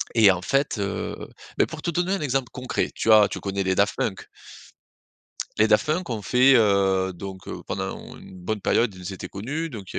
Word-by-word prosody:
et 105 -4 +7
en 90 - -2
fait, 135 +1 0
heu, 100 -1 -3 0.4
bah, - - +4
pour - - -8
te 170 - -1
donner 175 +3 0
un 195 - -2
exemple 135 -3 -1
concret, 125 -1 -2
tu 110 - +1
as 105 -2 +7
tu - - -5
connais 100 0 -3
les 95 0 0
Daft - - +2
Punk? - - -3 1.3
Les 110 - +4
Daft 105 -1 +3
Punk 160 +1 -1
ont 110 -3 -3
fait, 125 +6 +5
heu, 95 -3 +2
donc, 95 +1 -9
heu, - - -6
pendant - - -3
on - - -11
une 95 - -13
bonne 105 +4 -3
période, 115 +1 +1
ils 90 +1 -7
étaient 95 - -7
connus. 145 +12 -4
Donc, 105 -7 -9
il - - -6
105 Hz, 215 wpm, -24 LUFS, 95-135 Hz, 1.3 s, et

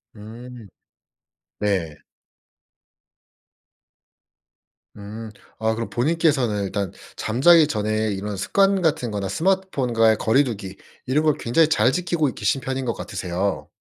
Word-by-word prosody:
음. 115 +2 -11 0.9
네. 90 -8 -1 3.0
음. 110 +2 -8 0.3
아 110 0 0
그럼 115 0 -4
본인께서는 135 -6 +1
일단 100 -1 -3 0.2
잠자기 150 +8 +4
전에 110 -3 -1
이런 100 +1 -4
습관 195 - +2
같은 145 -9 0
거나 100 -2 -3
스마트폰과의 130 - +1
거리 115 +7 +3
두기 100 -7 -6 0.3
이런 145 +5 +1
걸 155 -2 +3
굉장히 155 +7 +2
잘 125 -5 +3
지키고 170 -1 -1
계신 105 +7 0
편인 130 0 -4
것 115 - -1
같으세요. 95 +2 -3
115 Hz, 240 characters per minute, -22 LUFS, 105-150 Hz, 3.0 s, 잠자기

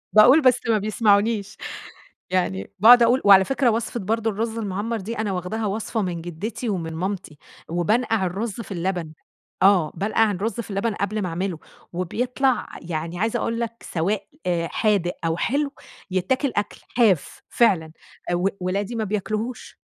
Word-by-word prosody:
باقول، 250 +9 +8
بس 255 -3 +4
ما 220 - +4
بيسمعونيش 210 0 +1 0.7
يعني 100 - -1
باقعد 235 +3 +9
أقول. 245 +3 +3
وعلى 195 -1 +8
فكرة 270 -2 +2
وصفة 230 +1 -1
برضه 225 +2 0
الرز 225 +2 -3
المعمّر 210 +2 -2
دي، 225 +4 -5
أنا 215 -2 -1
واخداها 190 +5 -3
وصفة 215 +2 -2
من 175 -3 -3
جدتي 200 +8 -5
ومن 165 -5 -3
مامتي، 180 -4 -4 0.3
وبانقَع 210 +5 +1
الرز 200 +4 -3
في 225 - -11
اللبن. 175 -3 -2 0.5
آه، 190 -6 +5
بانقَع 215 +2 +2
الرز 205 +5 -2
في 225 - -5
اللبن 200 +3 -1
قبل 210 +2 -2
ما 185 - -2
أعمله 175 -1 -3 0.3
وبيطلَع، 250 +9 0
يعني 165 +1 -4
عايزة 225 +2 0
أقول 230 0 -2
لك، 230 0 -5
سواء 195 +4 -2 0.4
حادق 200 -3 +1
أو 165 0 0
حلو؛ 285 +3 0 0.4
يتّاكل 255 +9 0
أكل. 205 0 -2
حاف، 210 - +2
فعلًا. 180 -9 +2 0.4
و 175 +2 +1
ولادي 200 +5 -2
ما 220 - -1
بياكلوهوش. 215 +3 -3
205 Hz, 150 wpm, -23 LUFS, 180-230 Hz, 0.7 s, باقعد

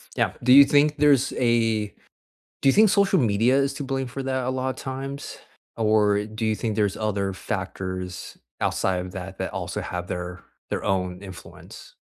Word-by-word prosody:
Yeah. - - +1
Do 125 - +3
you 140 0 +10
think 150 +2 +3
there's 140 -3 +3
a 115 -3 +1 0.7
do 135 - +4
you - - +4
think 215 0 +6
social 200 -1 +3
media 115 +1 +3
is 140 0 +1
to 145 - -5
blame 135 -1 -2
for 135 +2 -6
that 130 -1 -1
a 130 - -1
lot 130 0 -1
of 130 - -4
times? 135 +1 -6 0.4
Or 105 -2 +3
do 110 +1 -4
you 110 0 +1
think 110 -1 -3
there's 105 -2 +1
other 100 -3 -1
factors 90 0 -5 0.2
outside 95 -1 0
of 90 - -9
that 95 +1 -7
that - - -4
also - - -4
have 90 0 -5
their 90 +1 -5 0.3
their - - -3
own 90 -1 -1
influence? 95 -2 -12
115 Hz, 185 wpm, -24 LUFS, 95-135 Hz, 0.7 s, you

